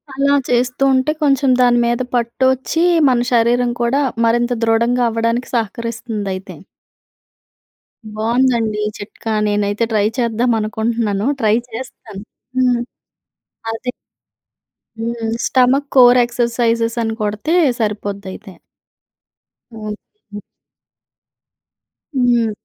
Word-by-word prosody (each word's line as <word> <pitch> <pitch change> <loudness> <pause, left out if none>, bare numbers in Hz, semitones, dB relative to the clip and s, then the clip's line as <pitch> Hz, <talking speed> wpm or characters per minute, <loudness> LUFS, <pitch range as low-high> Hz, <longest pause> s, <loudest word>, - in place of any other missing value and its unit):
అలా 280 +1 +2
చేస్తూ 250 +2 +1
ఉంటే 260 +3 +2
కొంచెం 275 -1 +2
దాని 245 -1 +4
మీద 240 +1 0
పట్టోచ్చి 260 +6 0 0.3
మన 245 -1 +1
శరీరం 240 +1 +2
కూడా 245 +4 +1 0.2
మరింత 240 +1 +2
దృఢంగవ్వడానికి 230 +1 +1
సహకరిస్తుందయితే. 225 -3 -4 1.6
బావుందండి. 230 -1 +1
ఈ - - -1
చిట్కా 220 +2 -7 0.2
నేనైతే 205 +1 0
ట్రై 210 -1 +2
చేద్దామనుకుంటున్నాను 225 -2 0 0.2
ట్రై 215 -1 +3
చేస్తాను. 225 -4 -9 0.4
హ్మ్. 250 -2 +3 0.9
అది 250 +2 -4 1.1
హ్మ్. 230 0 -3
స్టమక్ 265 +2 +2
కోర్ 250 -1 +7
ఎక్సర్సైజెస్ 235 -1 0
అని 225 0 -2
కొడితే 210 +9 -1 0.3
సరిపోద్దయితే. 205 -2 -4 1.2
ఓకే. 215 - -9 1.8
హ్మ్. 240 -3 +2
235 Hz, 85 wpm, -17 LUFS, 220-245 Hz, 1.8 s, కోర్